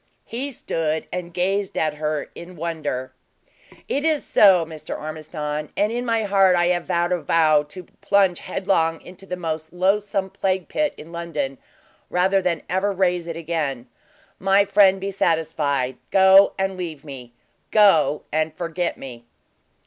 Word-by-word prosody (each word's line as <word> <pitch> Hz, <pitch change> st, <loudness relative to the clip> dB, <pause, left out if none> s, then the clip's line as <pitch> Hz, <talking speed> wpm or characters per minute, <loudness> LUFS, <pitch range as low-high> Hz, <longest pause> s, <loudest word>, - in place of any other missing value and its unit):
He 255 Hz, +5 st, -4 dB
stood 160 Hz, -, -2 dB
and 180 Hz, -1 st, -4 dB
gazed 190 Hz, +3 st, -1 dB
at 155 Hz, -1 st, +1 dB
her 150 Hz, -1 st, -3 dB
in 180 Hz, +1 st, -11 dB
wonder. 155 Hz, -6 st, -4 dB, 0.7 s
"It 285 Hz, -, -1 dB
is 315 Hz, -2 st, +1 dB
so, 190 Hz, -5 st, +5 dB
Mr. 160 Hz, -1 st, -7 dB
Ormiston; 155 Hz, -1 st, -5 dB
and 210 Hz, +2 st, +2 dB
in 245 Hz, +1 st, -3 dB
my 230 Hz, -1 st, +1 dB
heart 195 Hz, -2 st, +4 dB
I 175 Hz, 0 st, +2 dB
have 175 Hz, -1 st, 0 dB
vowed 175 Hz, +1 st, 0 dB
a 180 Hz, -2 st, 0 dB
vow 155 Hz, -1 st, +3 dB
to 150 Hz, +5 st, -10 dB, 0.2 s
plunge 195 Hz, -3 st, +2 dB
headlong 180 Hz, -4 st, 0 dB
into 185 Hz, +2 st, -13 dB
the 180 Hz, -, -3 dB
most 160 Hz, -2 st, -4 dB
loathsome 195 Hz, +1 st, 0 dB
plague 190 Hz, -2 st, -1 dB
pit 300 Hz, -1 st, -1 dB
in 160 Hz, -, -11 dB
London, 150 Hz, -6 st, -4 dB, 0.5 s
rather 190 Hz, +2 st, +2 dB
than 175 Hz, -4 st, -1 dB
ever 190 Hz, +3 st, 0 dB
raise 180 Hz, -3 st, 0 dB
it 165 Hz, -1 st, -5 dB
again. 155 Hz, -7 st, -3 dB, 0.5 s
My 195 Hz, +1 st, +3 dB
friend, 195 Hz, -1 st, +4 dB
be 195 Hz, +1 st, -3 dB
satisfied. 155 Hz, -8 st, 0 dB
Go 190 Hz, 0 st, +6 dB
and 190 Hz, 0 st, -1 dB
leave 160 Hz, -5 st, -6 dB
me; 130 Hz, -4 st, -10 dB, 0.4 s
go 165 Hz, -9 st, +4 dB
and 155 Hz, 0 st, -1 dB
forget 170 Hz, 0 st, -3 dB
me." 120 Hz, -3 st, -10 dB
175 Hz, 155 wpm, -22 LUFS, 155-195 Hz, 0.7 s, Go